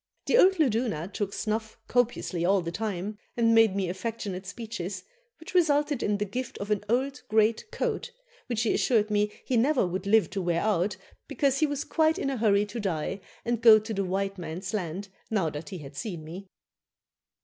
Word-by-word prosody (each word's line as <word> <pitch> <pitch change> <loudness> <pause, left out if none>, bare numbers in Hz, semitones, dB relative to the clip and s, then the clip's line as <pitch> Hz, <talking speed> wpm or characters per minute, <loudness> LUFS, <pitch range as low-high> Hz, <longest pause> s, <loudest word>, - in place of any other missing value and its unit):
The - - +2
old 385 -5 +6
luduna 225 - +1
took 200 -2 -2
snuff 220 +1 -3
copiously 240 -8 0
all 190 +2 +3
the 170 -1 -4
time, 205 +1 -3 0.2
and 230 -1 +4
made 225 -3 +5
me 195 -2 0
affectionate 190 0 -4
speeches, 200 -3 -5 0.4
which 320 - -10
resulted 295 -5 +3
in 205 0 +1
the 205 - -1
gift 250 +6 -5
of 205 +1 -5
an 205 -1 +1
old 265 +4 0
great 220 - +2
coat, - - -2 0.4
which 225 -2 0
he 225 - +2
assured 215 -4 +2
me 210 0 +2
he 250 - +1
never 260 0 +3
would 185 +2 -3
live 215 -4 +4
to 195 - -2
wear 170 -1 0
out, 205 -2 +1 0.3
because 275 -2 +1
he 310 - +3
was 290 0 -2
quite 315 -1 +2
in 275 - -1
a 265 - -2
hurry 205 -2 +3
to 210 +3 -6
die 190 -1 -2 0.2
and 235 -1 0
go 225 -2 +9
to 215 +1 -4
the 200 -1 0
white 195 +1 -2
man's 180 +4 -5
land 190 0 -3 0.2
now 190 -8 +1
that 150 +2 -7
he 190 - -6
had 145 -3 -10
seen 170 0 -5
me." 180 +5 -9
210 Hz, 195 wpm, -28 LUFS, 190-235 Hz, 0.4 s, go